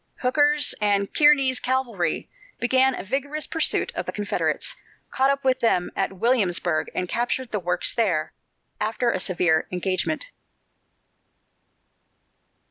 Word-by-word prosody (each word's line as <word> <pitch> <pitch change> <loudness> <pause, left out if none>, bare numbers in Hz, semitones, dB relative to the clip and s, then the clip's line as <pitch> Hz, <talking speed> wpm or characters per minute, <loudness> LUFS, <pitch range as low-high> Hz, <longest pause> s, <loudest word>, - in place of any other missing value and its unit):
Hooker's 290 +3 +3
and 200 -1 +1
Kearny's 275 -4 +4
cavalry 245 -10 -1 0.3
began 260 +2 +3
a - - -6
vigorous 285 +8 -2
pursuit 320 - 0
of - - -4
the - - -2
Confederates, 210 - -2 0.4
caught 265 +1 +2
up 275 0 0
with 260 -1 +2
them 180 -6 +1
at 195 0 -1
Williamsburg 180 -7 +1
and 180 - -1
captured 245 +4 -2
the 210 - -1
works 180 0 0
there, 180 -10 0 0.5
after 225 +3 0
a 185 - -2
severe 175 -3 +1
engagement. 190 - -2
235 Hz, 125 wpm, -24 LUFS, 185-265 Hz, 0.5 s, Kearny's